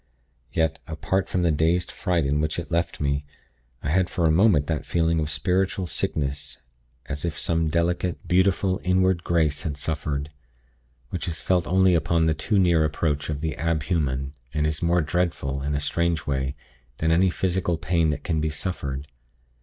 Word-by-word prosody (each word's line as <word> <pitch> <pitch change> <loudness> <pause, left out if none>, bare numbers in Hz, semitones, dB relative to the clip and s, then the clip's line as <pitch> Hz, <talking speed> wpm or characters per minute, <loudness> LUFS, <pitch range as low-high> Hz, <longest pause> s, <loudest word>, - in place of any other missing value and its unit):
Yet, 80 -1 0
apart 90 +4 -1
from 90 - 0
the 85 - +3
dazed 85 +3 +1
fright 85 -5 0
in 70 +2 +1
which 80 0 -1
it 85 0 -5
left 85 0 0
me, 70 0 0 0.6
I 70 - -1
had 90 +1 +2
for 85 -3 0
a 80 - +4
moment 85 -4 +4
that 80 0 -2
feeling 80 -1 +1
of 75 -1 -1
spiritual 90 +5 0
sickness, 75 -4 -3 0.5
as 70 - -5
if 85 -4 -2
some 80 -1 0
delicate, 85 +2 -1
beautiful, 95 +1 +2
inward 90 -1 +2
grace 80 -4 +1
had 75 -3 -3
suffered, 75 -1 -3 0.8
which 90 - -3
is 85 -1 -2
felt 90 -2 +1
only 95 0 +4
upon 85 0 +2
the 80 - +3
too 100 +7 0
near 85 -4 +4
approach 75 -1 -1
of 75 -2 -3
the 80 -1 -2
ab 80 -3 0
human, 70 -4 -1 0.2
and 75 0 +1
is 75 0 -1
more 85 +1 +3
dreadful, 75 -4 -1
in 70 +1 -1
a - - 0
strange 85 +2 0
way, 65 -1 -1 0.4
than 80 0 +1
any 90 +3 +4
physical 90 -1 0
pain 80 0 +1
that 75 -1 -2
can 80 -3 0
be 80 - 0
suffered. 70 -4 -4
80 Hz, 180 wpm, -25 LUFS, 75-90 Hz, 0.8 s, a